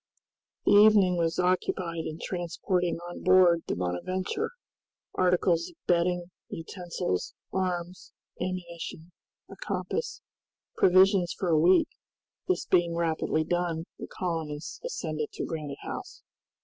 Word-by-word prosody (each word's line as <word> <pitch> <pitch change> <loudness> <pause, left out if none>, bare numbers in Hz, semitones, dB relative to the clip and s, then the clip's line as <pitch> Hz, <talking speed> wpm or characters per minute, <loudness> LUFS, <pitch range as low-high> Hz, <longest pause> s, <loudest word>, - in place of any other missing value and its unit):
The - - +4
evening 205 -3 +7
was 165 -1 0
occupied 180 -2 0
in 155 - -5
transporting 175 0 -1
on 175 - -8
board 180 -2 +5
the - - -1
"Bonadventure," 185 - -2 0.6
articles 180 -2 +2
of 350 - -18
bedding, 175 0 +1 0.2
utensils, 165 - -4 0.2
arms, 180 -1 -3 0.3
ammunition, 175 -2 -5 0.4
a - - -11
compass, 475 +1 -3 0.5
provisions 185 - +5
for 185 - -1
a 160 -2 +4
week; 185 - +5 0.6
this 370 - 0
being 175 -2 +2
rapidly 160 -1 0
done, 170 -1 -1 0.2
the - - -6
colonists 160 -4 -4
ascended 155 - -3
to - - -3
Granite 150 -4 -5
House. - - -7
175 Hz, 115 wpm, -28 LUFS, 165-185 Hz, 0.6 s, evening